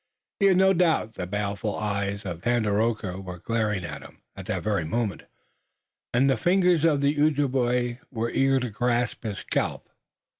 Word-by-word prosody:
He 200 - +5
had 190 -2 +4
no 190 +1 +5
doubt 165 - +2
the 90 - -5
baleful 100 +1 -2
eyes 100 -1 -2
of 85 -2 -5
Tandakora 110 -3 0
were 90 -2 -7
glaring 105 -1 -1
at 75 -3 -7
him - - -15
at - - -9
that - - -2
very 105 -5 0
moment, 100 +3 -2 0.9
and 125 +3 +3
that 135 - +3
the - - -15
fingers 180 -3 +3
of 150 -4 +3
the 145 +1 +1
Ojibway 125 -5 +1
were 115 -2 -2
eager 135 0 +3
to 125 -2 -3
grasp 120 +2 0
his 105 -3 -3
scalp. - - -2
120 Hz, 175 wpm, -26 LUFS, 100-135 Hz, 0.9 s, He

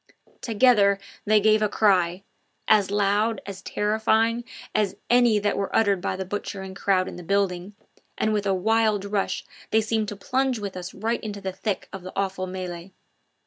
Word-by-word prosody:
Together 215 -4 +4 0.3
they 215 0 +5
gave 215 +1 +4
a 215 - +2
cry 185 -4 +2 0.4
as 205 -3 +4
loud, 205 +2 +1
as 195 -1 -7
terrifying 220 +3 +1 0.3
as 205 -3 +1 0.2
any 240 -3 +5
that 205 0 0
were 200 0 -2
uttered 200 -4 +3
by 185 - -2
the 190 0 -4
butchering 190 -1 -5
crowd 190 -1 +1
in - - -7
the 180 - -8
building, 195 +1 -1 0.4
and 215 0 +1
with 205 -1 0
a - - +2
wild 215 +1 +2
rush 200 -1 -2 0.2
they 220 - +3
seemed 220 0 0
to 205 - -5
plunge 255 +5 0
with 200 -3 -5
us 180 0 -6
right 230 +2 -1
into 205 -2 -5
the 190 -1 -4
thick 205 +1 -3
of 195 - -6
the 185 +1 -8
awful 195 -1 -2
melee. 180 -1 -6
205 Hz, 180 wpm, -25 LUFS, 190-220 Hz, 0.4 s, they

